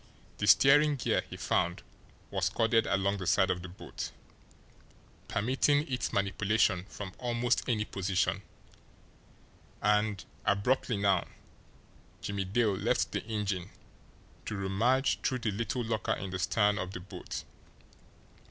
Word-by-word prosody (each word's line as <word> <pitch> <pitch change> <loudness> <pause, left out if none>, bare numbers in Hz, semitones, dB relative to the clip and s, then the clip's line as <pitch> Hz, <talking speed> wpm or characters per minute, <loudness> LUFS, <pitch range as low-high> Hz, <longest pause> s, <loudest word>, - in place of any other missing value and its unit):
The - - 0
steering 145 +2 +6
gear, 130 - +1
he - - -7
found, 85 +1 0 0.5
was - - +1
corded 115 0 +2
along 100 +1 +1
the 95 -2 -5
side 95 +1 +4
of 90 - -2
the 95 - -8
boat, 90 - -7 1.2
permitting 130 +6 +2
its 125 -3 -2
manipulation 100 -1 +1
from 95 -1 -8
almost 120 +1 0
any 105 -3 +1
position, 95 -2 0 1.4
and, 105 -1 +1 0.2
abruptly 110 +3 +1
now, 100 -3 +2 0.9
Jimmie 100 -1 -3
Dale 105 +2 +2
left - - 0
the - - -2
engine 105 -5 -2 0.8
to 105 - -3
rummage 115 +8 +1
through 130 - 0
the 115 -3 -1
little 115 +5 -2
locker 110 -3 -1
in 95 -1 -5
the 95 - -3
stern 105 +4 +2
of 95 -1 -4
the - - -5
boat. 90 +1 -7
105 Hz, 130 wpm, -31 LUFS, 95-120 Hz, 1.4 s, steering